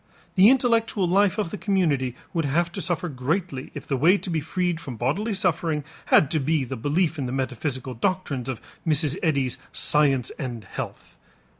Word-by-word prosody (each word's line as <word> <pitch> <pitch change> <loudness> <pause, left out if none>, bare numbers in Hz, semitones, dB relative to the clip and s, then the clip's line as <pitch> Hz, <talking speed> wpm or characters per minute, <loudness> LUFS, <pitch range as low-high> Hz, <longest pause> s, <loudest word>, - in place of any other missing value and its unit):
The 195 +3 +7
intellectual 230 -6 +2
life 195 +2 +3
of 205 -6 -1
the 210 - -5
community 150 - +1 0.2
would 165 -2 0
have 170 +5 +1
to - - -4
suffer 180 +2 -1
greatly 140 +1 -2
if - - -7
the 140 - -1
way 165 +9 +5
to 190 - -4
be 165 - +1
freed 175 +2 -1
from 140 -7 -7
bodily 165 - -1
suffering 165 -5 0 0.2
had 145 - +5
to 155 - +2
be 150 +1 +1
the 125 - -5
belief 150 +6 0
in 130 - -2
the - - -4
metaphysical 130 0 -3
doctrines 135 - -2
of 125 -4 -3 0.2
Mrs. 150 -2 +2
Eddy's 140 -6 0
"Science 140 -4 +2
and 120 -6 -4
Health." - - -8
155 Hz, 180 wpm, -25 LUFS, 135-185 Hz, 0.2 s, The